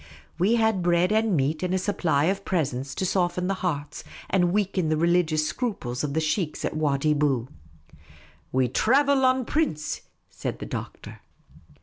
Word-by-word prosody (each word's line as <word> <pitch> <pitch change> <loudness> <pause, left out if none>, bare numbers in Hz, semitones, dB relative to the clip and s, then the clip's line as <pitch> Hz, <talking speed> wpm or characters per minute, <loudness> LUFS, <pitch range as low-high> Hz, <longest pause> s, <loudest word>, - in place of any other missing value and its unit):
We 200 +7 +3
had 220 -4 +2
bread 175 +2 +2
and 220 -4 +2
meat, 145 +3 0
and 180 0 0
a - - +2
supply 175 -7 0
of 195 +4 0
presents 140 -7 -2
to 190 - -1
soflen 180 -1 0
the 195 - +1
hearts 150 -5 -3 0.3
and 180 -2 +3
weaken 190 -4 0
the 155 - +1
religious 165 -2 +2
scruples 150 - -3
of 145 -1 -2
the - - +2
sheikhs 155 +1 -1
at - - -3
Wadi 150 -1 +1
Bou. 140 -5 0 0.5
" - - -25
We 130 -1 +2
thravel 270 - +3
en 255 -1 +2
prince,''' 155 - -1 0.3
said - - -5
the - - -7
Doctor. - - -7
175 Hz, 165 wpm, -25 LUFS, 150-195 Hz, 0.5 s, We